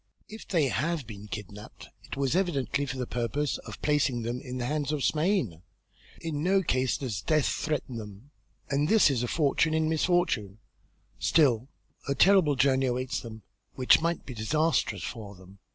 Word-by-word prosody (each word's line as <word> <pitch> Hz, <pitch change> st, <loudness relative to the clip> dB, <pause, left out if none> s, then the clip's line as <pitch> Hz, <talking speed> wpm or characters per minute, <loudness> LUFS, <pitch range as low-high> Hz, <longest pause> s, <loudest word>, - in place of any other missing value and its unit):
If 220 Hz, +1 st, -10 dB
they 160 Hz, -7 st, +2 dB
have 155 Hz, +3 st, -1 dB
been 105 Hz, -2 st, -9 dB
kidnapped 105 Hz, -1 st, -9 dB
it -, -, -8 dB
was 140 Hz, +2 st, 0 dB
evidently 145 Hz, -6 st, 0 dB
for 135 Hz, -, -4 dB
the 125 Hz, -, -2 dB
purpose 125 Hz, +5 st, -2 dB
of -, -, -10 dB
placing 145 Hz, -5 st, +1 dB
them 120 Hz, +2 st, -3 dB
in 130 Hz, -2 st, -6 dB
the 125 Hz, -, -2 dB
hands 150 Hz, +2 st, -1 dB
of 150 Hz, -3 st, -2 dB
Smain. 150 Hz, -, +1 dB, 0.6 s
In 155 Hz, -3 st, -3 dB
no 190 Hz, +3 st, +2 dB
case 130 Hz, -4 st, +1 dB
does 115 Hz, -7 st, -4 dB
death 155 Hz, +3 st, +2 dB
threaten 145 Hz, -5 st, -2 dB
them. 105 Hz, +5 st, -10 dB, 0.4 s
And 145 Hz, +3 st, 0 dB
this 220 Hz, -9 st, +5 dB
is 125 Hz, -4 st, 0 dB
a 120 Hz, -, -1 dB
fortune 155 Hz, +2 st, +1 dB
in 160 Hz, 0 st, +1 dB
misfortune; 160 Hz, -, +1 dB, 0.6 s
still 130 Hz, -6 st, +3 dB, 0.4 s
a 140 Hz, -, +1 dB
terrible 180 Hz, -2 st, +5 dB
journey 130 Hz, 0 st, +3 dB
awaits 125 Hz, +1 st, -1 dB
them 110 Hz, -2 st, -10 dB, 0.3 s
which 130 Hz, +3 st, +5 dB
might 170 Hz, 0 st, -1 dB
be 130 Hz, -, -7 dB
disastrous 115 Hz, -, 0 dB
for 105 Hz, -3 st, -7 dB
them." 95 Hz, +1 st, -16 dB
135 Hz, 170 wpm, -28 LUFS, 115-155 Hz, 0.6 s, this